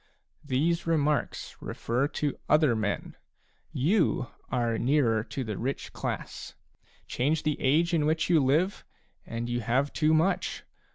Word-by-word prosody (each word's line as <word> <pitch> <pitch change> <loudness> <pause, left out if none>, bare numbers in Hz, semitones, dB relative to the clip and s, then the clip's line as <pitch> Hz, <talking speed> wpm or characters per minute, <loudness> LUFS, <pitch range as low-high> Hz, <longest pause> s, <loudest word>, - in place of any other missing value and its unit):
These 155 +5 0
remarks 150 -3 0
refer 125 +4 -1
to 145 -1 -3
other 150 -6 +4
men; 110 -2 -2 0.6
you 160 - +1 0.2
are 120 -3 0
nearer 120 -5 +2
the 110 -5 -3
rich 135 +3 -3
class. - - -5 0.5
Change 150 +5 0
the 155 -1 -1
age 165 +6 +3
in 150 -3 +2
which 160 +1 +1
you 165 -5 +4
live, 160 +9 +1 0.4
and 115 +1 -4
you 120 0 -1
have 125 +5 0
too 155 0 +3
much. 165 +5 0
145 Hz, 130 wpm, -28 LUFS, 120-160 Hz, 0.6 s, other